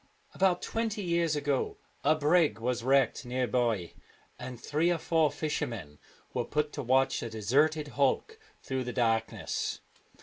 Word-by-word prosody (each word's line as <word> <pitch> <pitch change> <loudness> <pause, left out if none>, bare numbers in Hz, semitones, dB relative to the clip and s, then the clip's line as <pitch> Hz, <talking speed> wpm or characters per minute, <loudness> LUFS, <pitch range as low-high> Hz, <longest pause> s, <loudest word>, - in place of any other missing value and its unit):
About 185 -2 +2
twenty 225 -2 -2
years 170 -3 +1
ago 145 -2 -1 0.3
a 155 +2 +4
brig 155 0 +3
was 120 +1 -2
wrecked 135 -1 +3
near 125 +1 -1
by, 115 -9 0 0.5
and 125 -2 -7
three 155 +6 +1
or 175 - +1
four 160 -2 +2
fishermen 115 - -4 0.3
were - - 0
put 150 0 -1
to - - -3
watch 135 +2 +2
the 115 - -4
deserted 145 +8 +1
hulk 145 - 0 0.2
through 130 -1 -2
the 125 0 -5
dark 115 -2 +1
ness. - - -3
140 Hz, 155 wpm, -30 LUFS, 120-155 Hz, 0.5 s, a